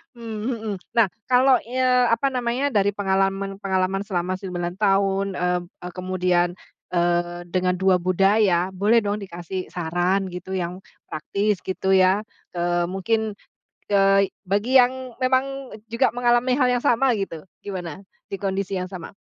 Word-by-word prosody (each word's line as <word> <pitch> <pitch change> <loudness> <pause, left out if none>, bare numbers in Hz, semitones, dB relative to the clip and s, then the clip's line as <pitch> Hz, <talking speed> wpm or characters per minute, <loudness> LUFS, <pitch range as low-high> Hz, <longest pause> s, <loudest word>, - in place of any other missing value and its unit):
Mmm, 225 -2 -6
mhm. 225 -4 -3 0.2
Nah, 230 -3 +5 0.2
kalau 255 0 +5
eee, 250 0 +2
apa 230 +4 +2
namanya. 250 +3 -1
Dari 205 -3 +2
pengalaman-pengalaman 195 -1 0
selama 185 -1 -1
9 175 -2 -4
tahun, 195 -1 +2
mmm 180 0 +1 0.2
eee, 180 - -6
kemudian, 180 -1 +1 0.4
eee, 175 0 +1
dengan 180 0 +1
2 190 0 +3
budaya, 185 0 +2
boleh 205 +5 +3
dong 205 +1 -1
dikasih 185 -1 -6
saran 180 +3 -1
gitu. 180 +2 -6
Yang 180 0 -3 0.2
praktis, 200 +5 -1
gitu 190 0 -1
ya. 185 +1 +4 0.4
Eee, 175 0 +1
mungkin, 220 +4 -1 0.6
eee, 195 -1 +4 0.2
bagi 205 +7 0
yang 255 0 +1
memang 265 +1 0 0.2
juga 235 +3 +2
mengalami 245 +1 +2
hal 255 -3 +3
yang - - -14
sama, 250 +2 +3
gitu. 190 -4 -5 0.2
Gimana? 185 -3 -6 0.3
Di 195 - -4
kondisi 195 0 -2
yang 185 0 -4
sama? 185 0 -9
195 Hz, 140 wpm, -23 LUFS, 180-230 Hz, 0.6 s, Nah